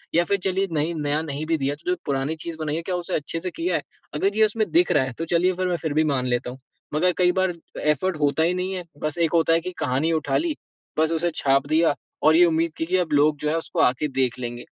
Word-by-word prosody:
या 170 - +5
फिर 200 - +1
चलिए 190 +1 +1
नहीं 160 +1 0
नया 150 0 0
नहीं 150 -1 -4
भी 165 0 +1
दिया 140 0 -1
तो 155 +4 -7
जो - - +2
पुरानी 140 +2 -1
चीज़ 165 +1 -7
बनाई 155 -1 -2
है 165 - -2
क्या - - +1
उसे 175 +1 -3
अच्छे 155 +3 -3
से 180 +2 -4
किया 335 - -1
है? - - 0 0.3
अगर 200 +2 0
ये 220 - +6
उसमें 215 0 -1
दिख 345 +2 +3
रहा 145 - +4
है, 130 -1 -4
तो 165 - -5
चलिए 175 +2 +2
फिर 185 0 -1
मैं 175 -1 0
फिर 160 -3 -3
भी 155 +1 +3
मान 135 -4 0
लेता 120 0 -1
हूँ। 130 - -11 0.4
मगर 180 +4 +3
कई 180 -1 +4
बार 185 0 +1 0.3
एफ़र्ट 155 +4 +1
होता 145 +2 +2
ही 170 +2 +2
नहीं 185 +1 -2
है। 185 -1 -4 0.2
बस 155 +1 -2
एक 165 -2 +2
होता 165 -1 +4
है 165 - +4
कि 185 +2 -5
कहानी 135 +6 0
उठा 155 -2 0
ली, 325 -2 -1 0.4
बस 160 +1 +3
उसे 170 +1 0
छाप 135 0 +2
दिया 160 +1 +3 0.3
और 155 +1 +6
ये 175 - +7
उम्मीद 165 0 +1
की 160 - -1
कि 185 +3 +1
अब 175 -4 -1
लोग 150 +1 +4
जो 150 - -1
है 155 - +1
उसको 165 - -4
आके 130 +4 +2
देख 130 -2 +1
लेंगे, 120 -1 -5
160 Hz, 275 wpm, -24 LUFS, 145-180 Hz, 0.4 s, ये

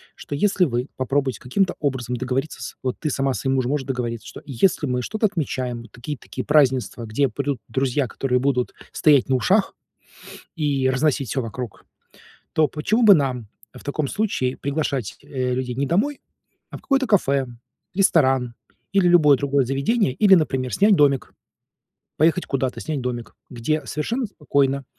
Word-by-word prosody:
что, 145 - -6
если 195 +3 +2
вы 125 -2 -2
попробуете 130 -2 -1
каким-то 185 +10 0
образом 125 -4 -2
договориться 130 +4 -3
с - - -6
вот 130 -1 -2
ты 155 - -2
сама 135 -1 0
со - - -4
своим 135 0 0
мужем 130 -1 0
можешь 145 -2 -2
договориться, 120 -3 -3
что - - -10
если 145 +5 +1
мы 125 -2 -1
что-то 215 - 0
отмечаем: 130 - -3
такие, 125 +6 -7
такие - - -7
празднества, 130 -5 +2
где 130 +5 +1
придут 140 +3 -3
друзья, 135 0 0
которые 125 +1 -1
будут 125 -1 0 0.2
стоять 145 -4 +3
на 130 - +3
ушах 195 - +2 0.8
и 140 -5 +1
разносить 135 -1 +1
всё 135 - -1
вокруг, 115 -1 -7 0.7
то 155 -1 +3
почему 215 +10 0
бы 210 -3 +9
нам 130 - -1 0.3
в - - -12
таком 145 0 -2
случае 160 -12 -1
приглашать, 140 -5 -2
э, 130 -2 -2
людей 125 -1 -3
не 140 +3 -1
домой, 240 - 0 0.5
а - - -7
в - - -22
какое-то 270 -1 +1
кафе, 140 - +2 0.5
ресторан 135 -10 +3 0.4
или 195 -3 +4
любое 150 -6 +6
другое 140 0 +1
заведение, 140 - +1
или, 195 +5 +6
например, 130 - 0
снять 205 +2 +5
домик, 140 -4 +2 0.9
поехать 165 +3 +3
куда-то, 130 -2 -2
снять 150 -4 -3
домик. 120 -2 -5
Где 130 +6 -2
совершенно 235 - -2
спокойно 140 -7 0
135 Hz, 165 wpm, -22 LUFS, 125-155 Hz, 0.9 s, бы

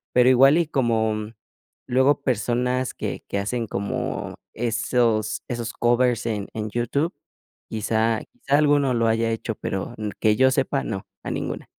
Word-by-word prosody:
Pero 125 0 +6
igual 135 +5 +6
y 170 - +1
como, 115 -6 +1
mm, 105 +1 -6 0.5
luego 135 +3 +3
personas 125 +1 0
que - - -5
que 100 - -2
hacen 115 +4 -2
como 100 0 -3 0.2
esos 115 -1 0
esos 120 -1 -4
covers 120 0 +2
en 105 -3 -2
en 110 -1 -3
YouTube, 130 - -1 0.6
quizá 110 +1 0
quizá 140 +1 0
alguno 145 -3 +3
lo 115 -1 +2
haya 115 0 +1
hecho, 115 0 -3
pero 95 +5 -4
n 105 -1 -3
que 105 -1 +3
yo 130 0 +5
sepa, 135 +1 0
no, 95 - -5 0.2
a - - -4
ninguna. - - -4
120 Hz, 160 wpm, -24 LUFS, 110-130 Hz, 0.6 s, Pero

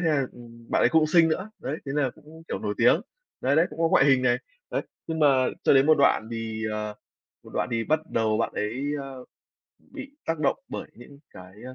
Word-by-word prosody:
thế 175 - 0
là, 140 -4 +1
ừm, 115 -1 -15
bạn - - +2
ấy - - +5
cũng 160 -1 +4
xinh 165 +1 +5
nữa, 190 +6 -2
đấy, 145 - -4
thế 135 - -3
nà 140 -4 +1
cũng, 160 +1 -15
kiểu, - - -3
nổi - - -3
tiếng. - - +5 0.4
Đấy, 140 +3 +1
đấy, 165 +2 +5
cũng 150 - -11
có 165 - +3
ngoại 135 - +5
hình 135 -2 +4
này, 125 -1 +3 0.3
đấy. - - -1 0.2
Nhưng 160 -1 -3
mà 150 - +5 0.4
cho - - +5
đến 135 +1 +5
một 155 - +7
đoạn 115 -5 +3
thì, 110 -1 -4
ờ, 105 0 -4 0.5
một - - -14
đoạn - - 0
thì 115 -1 -1
bắt 155 +4 +1
đầu 110 -1 +1
bạn 115 - 0
ấy, 115 +6 -3 0.2
ơ, 135 -2 -9 0.5
bị 275 +1 -11
tác 165 -1 -1
động 145 - +1
bởi - - -6
những 140 +4 -14
cái, 90 0 -13
a, 130 - -8
135 Hz, 235 wpm, -26 LUFS, 115-155 Hz, 0.5 s, một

